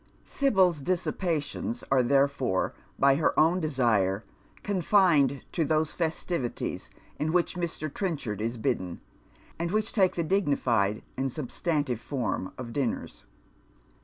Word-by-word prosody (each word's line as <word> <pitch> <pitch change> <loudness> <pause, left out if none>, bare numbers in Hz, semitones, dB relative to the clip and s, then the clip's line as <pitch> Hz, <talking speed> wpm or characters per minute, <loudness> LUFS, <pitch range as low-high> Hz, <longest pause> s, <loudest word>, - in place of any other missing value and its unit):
Sibyl's 190 - +2
dissipations 180 - -2
are 135 -1 +5
therefore, 135 -5 +1 0.2
by 140 0 +4
her 155 - +2
own 170 +4 +4
desire, 115 - +1 0.4
confined 175 -8 +3
to 165 - +1
those 155 +1 +1
festivities 160 -5 -3 0.3
to 155 - 0
which 175 +1 +1
Mr. 170 -3 -3
Trenchard 145 - -3
is 115 +2 -2
bidden, 95 -5 -2 0.6
and 170 0 -1
which 215 +3 0
take 190 -4 +3
the 170 - 0
dignified 130 - +1
and 135 0 -1
substantive 145 -2 -1
form 125 -8 -2
of 120 -2 -7
dinners. 135 -5 -3
145 Hz, 120 wpm, -28 LUFS, 125-175 Hz, 0.6 s, are